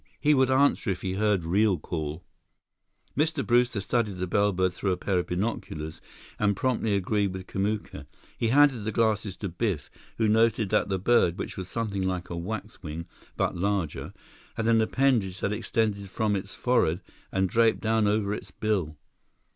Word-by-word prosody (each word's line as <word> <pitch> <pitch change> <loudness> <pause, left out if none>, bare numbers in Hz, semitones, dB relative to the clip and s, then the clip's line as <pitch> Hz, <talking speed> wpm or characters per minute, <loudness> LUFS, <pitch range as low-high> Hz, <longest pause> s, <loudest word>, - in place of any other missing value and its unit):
He 150 0 +4
would 130 -2 +3
answer 135 -4 +3
if 90 -2 -2
he 95 - -1
heard 100 -2 +1
real 95 +3 +2
call." 80 +1 -5 0.9
Mr. 155 0 0
Brewster 120 -2 +3
studied 100 0 -1
the 90 - -1
bellbird 95 -1 +1
through 95 +2 -1
a - - -3
pair 95 0 0
of 90 - -3
binoculars 90 -5 -3 0.4
and 105 -1 +2
promptly 115 -4 +1
agreed 100 0 0
with 95 0 -6
Kamuka. 100 +3 -3 0.3
He 115 - 0
handed 135 -2 +4
the 110 - -2
glasses 110 -3 +1
to 100 - -4
Biff, 90 -4 -2 0.3
who 110 - +2
noted 110 -1 +3
that 105 -1 +2
the 95 - +1
bird, 95 -3 +3
which - - -5
was 95 -2 -5
something 105 -3 -2
like 90 -1 -2
a - - -3
waxwing, 85 -3 -5 0.3
but - - 0
larger, 95 -3 -1 0.4
had 115 - -1
an 115 -1 +5
appendage 110 -6 +1
that 100 - 0
extended 105 -3 -1
from 105 +1 0
its 95 0 -5
forehead 90 -9 +1 0.3
and 95 0 +1
draped 115 +3 +3
down 110 -1 +2
over 105 -1 +1
its 100 -2 -6
bill. 90 -7 -1
100 Hz, 170 wpm, -27 LUFS, 95-115 Hz, 0.9 s, an